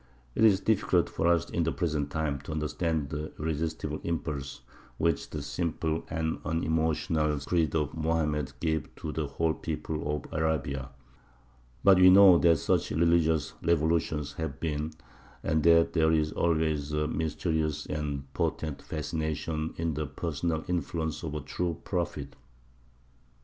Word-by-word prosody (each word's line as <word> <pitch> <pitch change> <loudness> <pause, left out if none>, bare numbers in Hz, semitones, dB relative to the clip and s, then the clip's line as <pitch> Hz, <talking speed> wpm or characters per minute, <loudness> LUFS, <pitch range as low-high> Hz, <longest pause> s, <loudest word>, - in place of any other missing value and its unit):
It - - +1
is 100 -4 +6
difficult 95 -5 +2
for 80 - 0
us 85 0 +3
in 85 - 0
the 80 0 +1
present 75 -5 -1
time 75 -2 -2
to 70 - -8
understand 75 -1 -1
the 75 +1 -4
irresistible 80 +1 -3
impulse 75 -5 -3 0.4
which 85 0 0
the 75 -2 -5
simple 80 +2 -2
and 80 0 -2
unemotional 80 -1 0
creed 80 +1 0
of 75 -2 0
Mohammed 80 -3 0
gave 80 -2 -1
to 80 - -5
the 75 -1 -2
whole 80 +3 0
people 75 -1 -3
of 75 - -6
Arabia; 75 -4 -1 0.9
but 95 -2 +7
we 90 0 +9
know 95 -2 +8
that 85 -2 +5
such - - +1
religious 80 -1 +2
revolutions 80 -3 +1
have 70 -3 -5
been, 75 -1 -2 0.5
and 80 0 +1
that 85 +1 +5
there 80 -1 +3
is 80 -1 +2
always 80 -3 0
a 75 0 0
mysterious 80 -1 -1
and 75 -2 -3
potent 75 -3 -2
fascination 80 0 -3
in 80 -1 -1
the 75 +1 -3
personal 80 +1 -2
influence 80 -2 -2
of 80 -3 -4
a 75 - -3
true 85 +2 -3
prophet. - - -3
80 Hz, 145 wpm, -29 LUFS, 75-85 Hz, 0.9 s, we